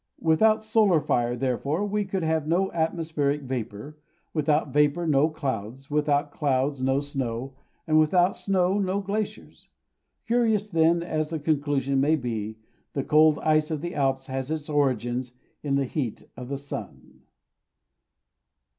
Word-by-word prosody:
Without 215 +7 +4
solar 220 -6 +3
fire, 120 -4 0
therefore, 135 - -1
we 205 0 -1
could 190 -2 -2
have 160 -1 0
no 185 +4 +1
atmospheric 160 -3 -1
vapour, 125 +3 -5 0.3
without 150 -2 +1
vapour 150 +3 +2
no 150 0 +3
clouds, 135 -3 -5
without 145 -1 +1
clouds 140 -1 0
no 135 +1 +2
snow, 135 -3 -4 0.3
and 155 -1 +4
without 175 +4 +3
snow 190 0 +1
no 195 0 0
glaciers. 200 +1 -5 0.6
Curious 225 -3 +1
then 165 +1 +3
as 155 -3 -2
the 165 - -2
conclusion 145 -3 0
may 150 +3 +3
be, 110 -6 -4 0.4
the 140 - -1
cold 155 +1 +5
ice 155 -1 +2
of 155 -3 -3
the 175 +1 -4
Alps 135 -1 0
has 130 0 -4
its 155 -1 -4
origin 130 -4 +1 0.4
in 140 -2 -1
this 135 -2 -1
heat 130 -8 -3
of 125 +1 -8
the 140 - -2
sun. 140 +1 -9
150 Hz, 145 wpm, -26 LUFS, 135-165 Hz, 0.6 s, cold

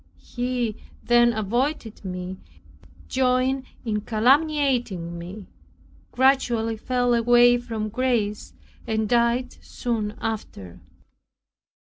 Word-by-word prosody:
He 245 -3 -1 0.3
then 240 0 +4
avoided 230 +3 -2
me, 180 0 -6 0.7
joined 260 +1 +1 0.2
in 210 -2 -1
calumniating 245 - +1
me, 185 +4 -8 0.7
gradually 245 -4 +2
fell 245 +2 0
away 240 +1 +5
from 225 -3 -4
grace, 225 -3 -1 0.3
and 220 -1 0
died 240 +2 +1
soon 220 -3 -3
after. 100 - -5
235 Hz, 85 wpm, -24 LUFS, 215-250 Hz, 0.7 s, away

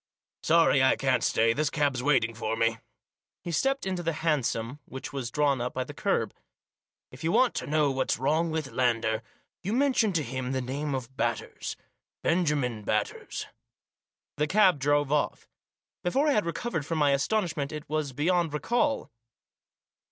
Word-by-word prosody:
Sorry - - +4
I - - +5
can't - - +1
stay, 115 0 +3
this 150 +3 0
cab's 145 -4 0
waiting 125 -4 +2
for 110 0 -2
me." 115 0 +1 0.6
He 175 - -4
stepped 270 - +1
into 185 -2 -2
the 165 -1 -1
hansom 135 -4 0
which 130 +2 -8
was 130 -4 -3
drawn 140 -1 +1
up 125 +1 -3
by 130 - 0
the 145 - -9
kerb. 145 - 0 0.4
" - - -67
If - - -11
you 165 - +1
want 255 +5 +4
to - - -3
know 150 -1 +2
what's 130 -1 0
wrong 155 +7 +1
with 155 -3 -3
Lander, 115 -3 +1 0.4
you 200 +4 -2
mention 255 -4 +3
to 160 -3 +1
him 130 +1 -3
the 130 - 0
name 135 +3 -3
of 130 0 -6
Batters - - -2 0.2
— - - -64
Benjamin 145 -10 +1
Batters." 105 0 -2 0.9
The 150 +1 +1
cab 190 -4 +4
drove 145 +1 +2
off. 150 -1 0 0.6
Before 270 +12 +2
I - - +4
had 210 -9 +1
recovered 170 -2 -2
from 165 +2 -3
my 145 -2 +4
astonishment 150 -1 0
it 150 -1 -7
was 155 -2 -1
beyond 165 +3 +1
recall. 245 - 0
145 Hz, 170 wpm, -28 LUFS, 130-170 Hz, 0.9 s, I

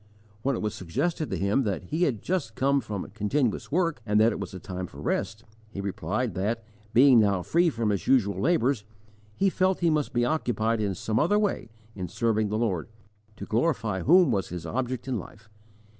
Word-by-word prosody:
When 135 +2 0
it - - -4
was 105 - -1
suggested 155 - -2
to - - -2
him 100 +7 +1
that 100 -9 -2
he 160 - 0
had 120 -9 -2
just 165 -12 -2
come 140 +1 +2
from 100 -5 -5
continuous 120 +5 -1
work, 165 -5 0
and 105 -1 +2
that 110 +2 +5
it - - -4
was 100 -3 -5
a 95 - -7
time 90 0 -5
for - - -13
rest, 110 +1 -2 0.3
he 100 - -8
replied 100 +4 -2
that, 110 +6 -2 0.3
being 130 0 +7
now 100 -4 +2
free 170 - +3
from 115 -7 -1
his 100 - -2
usual 100 -8 +3
labours, 135 -8 +2 0.5
he 195 - +2
felt 185 0 +1
he 170 -2 +3
must 150 -2 0
be 120 0 +1
occupied 115 -6 0
in 100 -3 -1
some 110 +4 -1
other 175 +7 +3
way 205 - -1 0.2
in 95 -3 -5
serving 110 +2 0
the 105 - -1
Lord, 100 -8 -1 0.5
to - - -7
glorify 115 - 0
whom 175 - +5
was 95 - -1
his 85 -1 -6
object 125 +6 -3
in 125 -4 -1
life. 105 +3 -13
115 Hz, 205 wpm, -27 LUFS, 100-140 Hz, 0.5 s, being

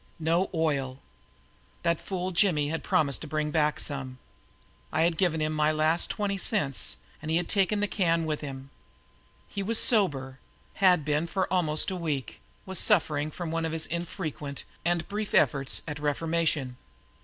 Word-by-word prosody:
No 165 +3 +1
oil! 140 -6 -1 0.9
That 170 -1 +1
fool 185 -1 -3
Jimmy 165 -5 +2
had 165 +1 -3
promised 140 -3 +1
to 155 - -6
brink 150 0 -2
back 150 -1 +1
some. 135 -2 -3 0.7
I 160 +2 +2
had 170 0 +2
given 165 -3 +1
him 155 0 0
my 155 0 +2
last 155 +2 +2
twenty 200 -2 -2
cents 175 - 0 0.2
and 155 - -6
he 160 - +2
had 175 - -1
taken 205 +1 +2
the 205 - +1
can 170 -5 +1
with 155 -1 -2
him. 135 -1 -8 0.8
He 200 - -5
was 220 +3 +2
sober, 140 - +4 0.4
had 180 -6 +5
been 150 +2 0
for 190 +2 0
almost 160 -1 +2
a - - -3
week, 155 -7 -4 0.2
was 190 -1 -2
suffering 155 -7 +2
from 165 +1 -6
one 165 0 -1
of 160 -1 -2
his 160 -1 0
infrequent 160 -4 -5 0.2
and 170 -1 0
brief 210 +1 -3
efforts 140 -2 +3
at 150 -1 -5
reformation. 150 -3 -1
160 Hz, 165 wpm, -28 LUFS, 150-180 Hz, 0.9 s, had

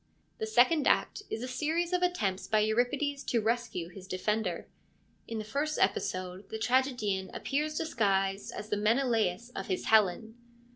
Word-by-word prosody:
The 220 - -2
second 250 +7 +4
act - - +2
is 225 - -4
a - - -3
series 320 +7 -1
of 360 - +2
attempts 215 - 0
by 215 -1 +3
Euripides 260 +6 0
to 235 - +1
rescue 225 -6 -1
his 190 +1 -11
defender. 190 -1 -1 0.6
In 225 - -4
the 215 - -3
first 290 +7 -1
episode 185 0 -1
the 220 - -4
tragedian 220 -5 +1
appears 300 +2 -1
disguised 195 -9 0
as 210 - -7
the 210 - 0
Menelaus 225 -1 +1
of 195 - -6
his 185 - -2
Helen. 220 +1 +3
220 Hz, 155 wpm, -30 LUFS, 195-265 Hz, 0.6 s, second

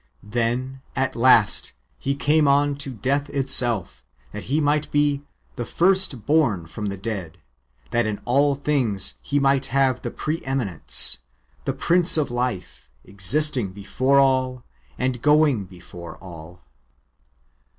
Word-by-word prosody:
Then, 120 +5 -2
at 130 0 -1
last. 115 - +4 0.3
He 140 +1 -2
came 150 +1 +2
on 145 +1 +3
to 140 -1 -3
death 135 +4 -2
itself, 125 -7 -1 0.3
that - - -8
He 145 +4 0
might 150 0 0
be 145 -1 +1 0.2
" - - -38
the 120 - -2
first 180 - +2
born 130 - +2
from 105 +6 -6
the 100 0 -4
dead, 95 -5 -5 0.5
that 120 -1 +1
in 105 -1 -3
all 140 +3 +2
things 110 - 0
He 145 - -1
might 135 -1 +2
have 130 -2 +1
the - - -4
pre 155 +2 -4
eminence," 125 - 0 0.4
^ - - -30
the - - -1
Prince 175 -1 +2
of 150 -5 0
life,^ 120 - -4 0.2
existing 115 +2 0
before 130 +7 0
all, 130 -2 +2 0.3
and 125 -1 -2
going 150 -7 +3
before 90 -2 -11
all. 85 -1 -12
130 Hz, 140 wpm, -23 LUFS, 105-145 Hz, 0.5 s, last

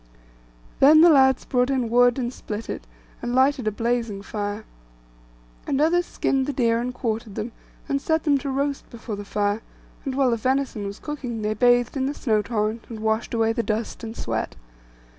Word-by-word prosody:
Then 305 +3 +8
the 340 0 +8
lads 265 -3 +4
brought 250 -1 +1
in 260 -3 0
wood, 245 +2 +4
and 245 -1 -2
split 215 -2 -6
it, - - -7 0.3
and 240 +1 -2
lighted 260 -2 +3
a - - +2
blazing 230 -2 -2
fire; 205 +1 -4 1.0
and 275 - 0
others 345 +3 +3
skinned 270 0 0
the 290 - -1
deer 235 -3 +2
and 250 +1 -2
quartered 225 -4 -3
them, 230 +3 -4 0.4
and 275 0 0
set 320 +1 +1
them 285 -3 +3
to 280 - -4
roast 280 +1 -2
before 230 -2 -6
the 205 - -6
fire; 205 +1 -1 0.4
and 270 -3 -3
while 265 -2 +3
the 230 - +1
venison 255 -3 -1
was 200 +1 -6
cooking 250 -7 -5
they 210 0 0
bathed 245 +3 +3
in 265 -1 0
the 285 - -3
snow 220 -5 +1
torrent, 215 +1 -2
and 225 -2 -7
washed 220 +2 0
away 225 0 +2
the 235 - 0
dust 220 +1 -3
and 225 0 -6
sweat. 110 -1 -3
240 Hz, 195 wpm, -24 LUFS, 220-270 Hz, 1.0 s, Then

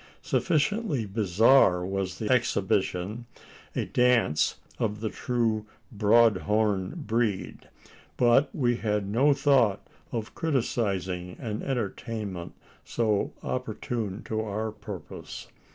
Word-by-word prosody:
Sufficiently 160 - +1
bizarre 100 -1 +4
was 95 -2 -3
the 110 - -2
exhibition 105 -2 0 0.5
a - - 0
dance 125 -11 +2 0.2
of 105 -1 -1
the 110 0 -2
true 115 -3 -1 0.2
"broad 110 0 +4
horn" 105 - 0
breed; 110 -4 -1 0.5
but 125 +4 +4
we 120 -5 +1
had 105 -3 -1
no 125 +8 +3
thought 130 -9 +3 0.3
of 115 -2 -4
criticising 95 - -1
an 110 -2 -4
entertainment 110 -6 -4 0.3
so 110 -3 0
opportune 115 -4 -3
to 110 0 -2
our 110 +1 -3
purpose. 100 -5 -9
110 Hz, 105 wpm, -27 LUFS, 100-120 Hz, 0.5 s, bizarre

